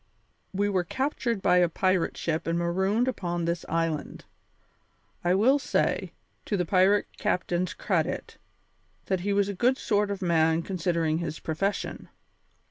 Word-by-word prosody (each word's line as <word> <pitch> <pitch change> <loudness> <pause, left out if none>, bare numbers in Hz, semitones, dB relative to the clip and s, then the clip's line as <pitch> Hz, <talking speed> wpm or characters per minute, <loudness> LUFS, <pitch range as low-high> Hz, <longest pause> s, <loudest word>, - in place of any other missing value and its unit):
We 200 +1 0
were 190 -3 +1
captured 240 - -2
by 180 -1 +4
a 175 -1 +4
pirate 185 +1 +1
ship 165 -1 -2
and 165 +1 +1
marooned 190 +7 +1
upon 175 -8 -2
this 170 0 -1
island. 165 -2 -2 1.0
I 175 +1 +3
will 255 +8 +4
say, - - 0 0.3
to 205 - -1
the 180 - 0
pirate 190 +3 +4
captain's 180 +1 -1
credit, - - -2 0.7
that 190 -1 0
he 200 +3 -2
was 200 0 +2
a 200 - -3
good 250 +7 +2
sort 205 -1 +1
of 200 -1 -3
man 165 -1 +2
considering 170 -3 0
his 155 -2 -4
profession. 195 +6 -3
185 Hz, 145 wpm, -27 LUFS, 170-200 Hz, 1.0 s, by